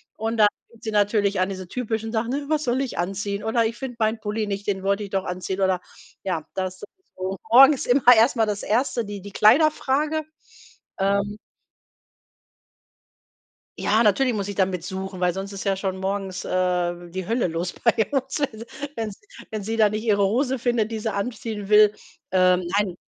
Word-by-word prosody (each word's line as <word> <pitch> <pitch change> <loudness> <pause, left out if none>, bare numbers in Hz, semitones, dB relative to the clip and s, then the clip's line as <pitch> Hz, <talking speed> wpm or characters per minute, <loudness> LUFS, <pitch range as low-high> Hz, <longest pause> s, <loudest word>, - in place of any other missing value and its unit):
Und 225 +1 -2
dann 210 - +7 0.2
fängt 230 -1 -21
sie 220 - -3
natürlich 205 -1 +2
an, 185 - +2
diese 185 -1 -6
typischen 225 -2 -3
Sachen: 230 +2 -1
„Äh, 285 +1 -3
was 305 -1 +1
soll 250 +2 +1
ich 265 - -4
anziehen?“ 200 +3 -2
Oder: 225 +1 +2
„Ich 230 +1 -3
finde 265 -3 -6
meinen 220 +1 +1
Pulli 215 0 -2
nicht, 200 0 -4
den 195 -2 -1
wollte 200 +1 +1
ich 200 - -7
doch 195 -1 0
anziehen.“ 185 +2 -4
Oder 190 -1 +2 0.4
ja, 170 -5 -2
das 185 -1 -2
ist - - -20 0.3
sowieso 185 +1 -4
morgens 270 +3 +7
immer 245 0 +6
erst 230 +5 +4
mal 225 -2 +3
das 205 -1 -3
1. 235 +1 0
die 205 -1 -7
die 205 +1 -10
Kleiderfrage. 300 +6 +3 0.8
Ähm 200 +1 0 2.4
Ja, 220 +3 +2
natürlich 245 +4 +3
muss 205 -2 -3
ich 200 - -5
da 190 -1 +3
mit 180 -3 -4
suchen, 190 0 -6
weil 180 -1 +2
sonst 195 +2 -6
ist 195 - -6
ja 195 -1 0
schon 190 -1 -3
morgens, 190 -1 -3
äh, 175 -1 -1
die 185 +1 -4
Hölle 230 -1 +1
los 170 +2 -3
bei 230 - +2 0.2
uns. 270 +1 -1
Also, 230 -5 -3 0.3
wenn 220 -2 -2
sie 195 - -15 0.3
wenn 215 -2 -4
sie 225 +3 -3
da 215 -2 +5
nicht 215 +1 -3
ihre 205 -3 +2
Hose 255 +4 0
findet, 235 -3 0
die 220 - -3
sie 215 -1 -2
anziehen 215 -1 -4
will, 210 0 +6 0.4
ähm 185 -1 +4 0.2
nein. 195 -4 0
210 Hz, 195 wpm, -24 LUFS, 190-230 Hz, 2.4 s, dann